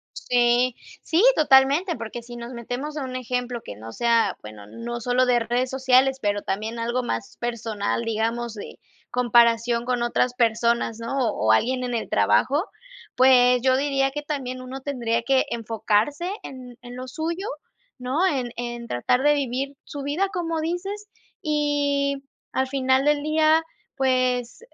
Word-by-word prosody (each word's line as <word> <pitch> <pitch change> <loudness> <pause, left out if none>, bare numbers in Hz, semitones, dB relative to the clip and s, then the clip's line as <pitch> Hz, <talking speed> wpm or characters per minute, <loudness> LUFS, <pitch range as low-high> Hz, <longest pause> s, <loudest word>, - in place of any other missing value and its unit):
Sí. 245 0 +2 0.3
Sí, 335 +5 +2
totalmente, 290 +5 +4
porque 230 +1 -6
si 240 +1 -11
nos 235 +1 -7
metemos 250 +6 -5
en 290 - -2
un 255 -1 -6
ejemplo 250 -1 -3
que - - -8
no 110 +2 -9
sea 230 -4 +2
Bueno, 105 -1 -11
no 235 - -6
sólo 245 +2 +2
de 245 -1 +3
redes 245 +2 -1
sociales, 265 0 +3
pero 205 -1 0
también 215 +5 -3
algo 240 +2 -1
más 230 -3 -4
personal, 230 -3 -2
digamos, 230 +1 -2
de 210 - -9 0.3
comparación 235 -1 +3
con 245 -1 0
otras 245 +1 +1
personas, 235 -1 +1
¿no?, 230 +4 -3
o 220 - 0
o - - +6
alguien 255 - +2
en 245 -1 -3
el 230 - -3
trabajo. 290 +5 +2 0.5
Pues, 250 -1 +6
yo 260 +1 +3
diría 270 -1 +1
que 295 +2 -4
también, 265 -4 -4
uno 255 +1 -7
tendría 240 -4 -1
que 265 +2 +2
enfocarse 230 - 0
en 250 -2 -10
en 245 0 -10
lo 255 +1 -7
suyo, 335 +8 -4 0.5
¿no? 260 +8 0
En 255 -8 -1
en 240 0 -5
tratar 235 - +1
de 295 0 +5
vivir 275 0 -2
su 285 - -7
vida, 300 +8 0
como 330 -3 -2
dices. 390 +6 -4 0.3
Y, 285 -2 0 0.3
al 265 0 +1
final 260 0 +2
del 295 0 +3
día, 310 +1 +3 0.3
pues, 255 -2 +1
250 Hz, 160 wpm, -24 LUFS, 235-275 Hz, 0.5 s, o